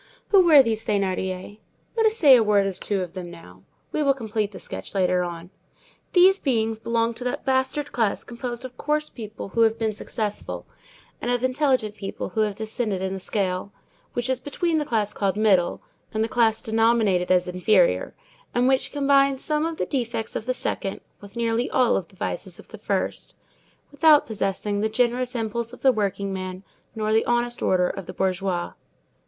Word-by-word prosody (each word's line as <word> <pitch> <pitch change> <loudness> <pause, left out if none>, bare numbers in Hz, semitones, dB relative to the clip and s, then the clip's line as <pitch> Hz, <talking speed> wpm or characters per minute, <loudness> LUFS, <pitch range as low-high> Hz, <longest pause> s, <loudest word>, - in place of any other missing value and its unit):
Who 390 -3 +6
were 305 -5 +8
these 225 -2 -1
Thénardiers? 190 0 -2 0.4
Let 450 -1 +4
us 435 +1 +1
say 285 - +8
a 240 - +5
word 205 -2 +3
or 195 - -1
two 195 +1 -2
of 175 -1 -8
them 180 -2 -6
now. 95 - -13 0.3
We 305 - -1
will 275 -2 +3
complete 220 -4 -2
the - - -9
sketch - - -8
later 180 -1 +2
on. 175 0 -6 0.6
These 380 +2 +6
beings 225 -5 0
belonged 230 0 0
to 245 - -6
that 250 - -3
bastard 265 +2 0
class 225 -4 0
composed 240 +1 -6
of 250 -1 -10
coarse 300 0 -1
people 215 -3 -8
who 230 - 0
have 225 0 +4
been 220 -2 -1
successful, 210 0 -4 0.6
and 240 - -2
of 245 0 0
intelligent 255 -5 +1
people 195 -2 -6
who 220 +4 -1
have 210 -2 0
descended 220 -2 -2
in 190 0 -2
the 190 - -4
scale, 190 0 -2 0.4
which 240 0 -2
is 260 -1 0
between 320 +4 -1
the 300 - -2
class 215 -5 -1
called 195 -1 -1
"middle" 195 -5 +2 0.3
and 220 - +2
the - - 0
class 225 -2 +2
denominated 220 -5 +2
as 180 -1 +3
"inferior," 180 - +2 0.4
and 245 +1 +3
which 265 0 +2
combines 275 -1 +3
some 305 +1 0
of 330 -1 -5
the - - -1
defects 235 -5 -3
of 220 - -4
the 255 - +1
second 195 -5 -3 0.2
with 200 +1 -14
nearly 235 +1 0
all 250 -6 +3
the 190 +2 -22
vices - - -5
of - - -15
the - - -10
first, - - -3 0.6
without 295 +1 +5
possessing 205 -3 -2
the 220 - +1
generous 245 +2 0
impulse 230 +1 -2
of 250 - -13
the 265 - +6
workingman 195 -3 -3 0.3
nor 215 -1 0
the 225 - +4
honest 240 0 0
order 180 -1 +2
of 190 -1 -6
the 185 - -7
bourgeois. 185 -1 -1
220 Hz, 190 wpm, -24 LUFS, 195-255 Hz, 0.6 s, were